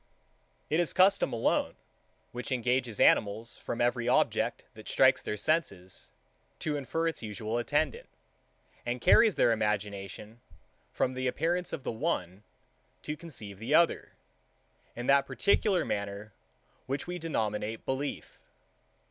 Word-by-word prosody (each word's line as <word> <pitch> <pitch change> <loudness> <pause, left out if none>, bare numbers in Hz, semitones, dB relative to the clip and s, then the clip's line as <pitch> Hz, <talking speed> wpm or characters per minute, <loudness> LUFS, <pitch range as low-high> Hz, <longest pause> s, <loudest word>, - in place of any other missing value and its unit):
It 155 - +3
is 175 - +1
custom 190 +2 +4
alone, 115 - 0 0.6
which 125 +1 -5
engages 125 -2 0
animals, 110 +3 +3
from 120 - -5
every 120 0 +1
object, 125 - +1
that - - -13
strikes - - +4
their 105 - -4
senses, 100 - -2 0.5
to 150 -2 -2
infer 160 +4 -1
its 165 - -3
usual 110 +1 -3
attendant, 145 +2 -1 0.8
and 120 +1 -2
carries 215 - +5
their 120 - +4
imagination, 105 0 -3 0.5
from 130 - 0
the 130 0 -2
appearance 170 +7 -1
of 135 - -5
the - - -2
one, 110 - -2 0.6
to 150 - -3
conceive 110 - -8
the 125 +7 +1
other, 170 +1 +2 0.8
in 120 - -5
that 140 +1 +4
particular 190 +7 +2
manner, 100 0 -4 0.5
which 135 +2 -2
we 175 0 -5
denominate 110 -8 -2
belief. 135 +2 -4
120 Hz, 130 wpm, -30 LUFS, 105-155 Hz, 0.8 s, carries